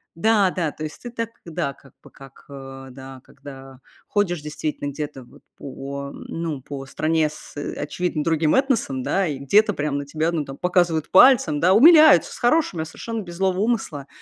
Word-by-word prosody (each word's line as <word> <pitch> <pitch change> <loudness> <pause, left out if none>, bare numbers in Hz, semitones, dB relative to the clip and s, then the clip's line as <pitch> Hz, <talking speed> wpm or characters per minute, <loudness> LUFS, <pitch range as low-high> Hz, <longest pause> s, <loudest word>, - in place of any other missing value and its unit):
Да, 205 +1 +3
да, 165 -5 -2
то 155 - -9
есть 155 - -7
ты 240 - -7
так, 230 -1 -4 0.2
да, 165 -4 -3
как 135 -2 -21
бы, - - -15
как 135 -2 -16
ы - - -11
м, 135 -1 -10
да, 135 -1 -11
когда 135 -2 -13 0.3
ходишь 180 -6 -1
действительно 150 -1 -4
где-то 145 -2 -6
вот - - -19 0.2
по, 140 +1 -7
ну, 160 -5 -6
по 135 0 -8
стране 155 +1 0
с, 150 - -13
э, 145 - -5
очевидно 155 0 -3
другим 160 -2 +1
этносом, 245 - 0
да, 190 -2 0
и 145 -3 -3
где-то 205 +10 +3
прям 145 -1 -2
на 140 - -6
тебя 155 +3 -1
там, 160 -3 -2
ну, 135 - -8
показывают 175 -3 0
пальцем, 190 - +6
да, 185 +2 +4
умиляются 310 - +7
с - - -9
хорошими, 240 - +1
а, - - -3
совершенно 225 +7 -6
без 175 -3 -10
злого 190 0 0
умысла. 205 - -2
155 Hz, 195 wpm, -22 LUFS, 140-190 Hz, 0.3 s, умиляются